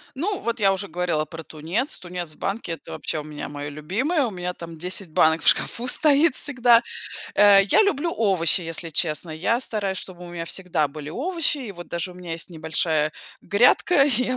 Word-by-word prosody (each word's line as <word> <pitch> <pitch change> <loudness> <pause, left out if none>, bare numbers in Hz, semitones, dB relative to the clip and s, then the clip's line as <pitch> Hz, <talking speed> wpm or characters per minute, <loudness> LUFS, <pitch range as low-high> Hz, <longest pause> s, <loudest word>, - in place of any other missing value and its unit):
Ну, 390 +8 -2
вот, 235 0 -2
я 195 -1 +4
уже 195 +1 -3
говорила 170 -2 -1
про 165 +1 -9
тунец. 170 - -3
Тунец 175 -3 -6
в - - -20
банке- 195 -3 -3
это, - - -10
вообще, 155 - -3
у 150 - -6
меня, 150 -1 -7
мое 145 0 -6
любимое, 230 - -1
у 225 - -3
меня, 180 -1 -4
там, 165 -2 -9
10 180 +1 -2
банок 160 +1 +3
в - - -2
шкафу 245 +1 +2
стоит 295 +1 +3
всегда, 245 -4 +4 0.5
э, 200 -1 +7
я 320 - +4
люблю 340 -5 0
овощи, 190 -5 +2
если 165 0 -4
честно. 155 +1 +1
Я 185 +10 0
стараюсь, 200 -6 -2
чтобы 180 -1 -8
у - - -10
меня 170 -1 -5
всегда 165 -4 0
были 150 +1 -8
овощи 320 - 0
и, 235 -6 -6
вот, 175 -2 -10
даже 170 +1 -3
у - - -17
меня 180 -2 -7
есть 165 +2 -6
небольшая 160 -1 -1 0.3
грядка, 245 - +4
я 255 -1 +1
180 Hz, 200 wpm, -23 LUFS, 165-240 Hz, 0.5 s, э